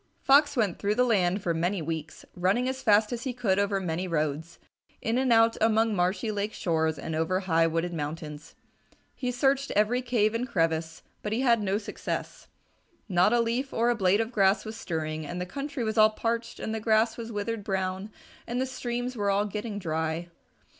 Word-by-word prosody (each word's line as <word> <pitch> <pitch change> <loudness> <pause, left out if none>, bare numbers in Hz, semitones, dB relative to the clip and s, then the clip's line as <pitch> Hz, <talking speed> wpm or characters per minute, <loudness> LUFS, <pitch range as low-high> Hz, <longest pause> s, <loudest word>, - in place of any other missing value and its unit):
Fox 285 +1 +5
went 210 -7 +1
through 205 +1 0
the 250 - +4
land 195 -5 +2
for 170 - +1
many 175 +4 0
weeks, 160 -1 -5
running 190 +8 +1
as 260 0 -3
fast 215 -1 +4
as 235 - -4
he 260 -2 -3
could 210 -6 +1
over 200 -1 +1
many 180 0 -2
roads, 155 0 -2 0.4
in 230 +3 0
and 260 -2 +1
out 225 0 +5
among 225 0 +3
marshy 185 +4 0
lake 205 +1 -2
shores 160 -2 0
and 160 - -5
over 165 +4 0
high 165 -3 +2
wooded 165 +2 -1
mountains. 150 -1 -6 0.6
He 250 -2 -2
searched 270 +2 +1
every 215 +5 +2
cave 230 -4 +1
and 240 +2 -2
crevice, 165 -5 -1 0.2
but 210 - -3
he 235 - 0
had 235 -4 +3
no 200 0 0
success. 210 - -5 0.6
Not 180 0 +3
a 240 - +3
leaf 235 +4 -1
or 235 +1 +2
a - - +1
blade 195 0 +3
of 225 +1 -3
grass 200 -2 +3
was 220 0 -6
stirring, 155 -6 -3
and 175 +4 -5
the 180 - -2
country 275 +5 -4
was 220 0 0
all 215 0 +8
parched 230 +1 -3
and 220 - -3
the 220 - -2
grass 220 +1 +2
was 230 -1 -7
withered 210 +1 -3
brown 190 0 -2 0.4
and 240 +1 -2
the 260 - +1
streams 250 -1 -4
were 205 -3 0
all 200 +1 +2
getting 210 +1 -4
dry. 160 -1 -2
210 Hz, 200 wpm, -28 LUFS, 175-235 Hz, 0.6 s, all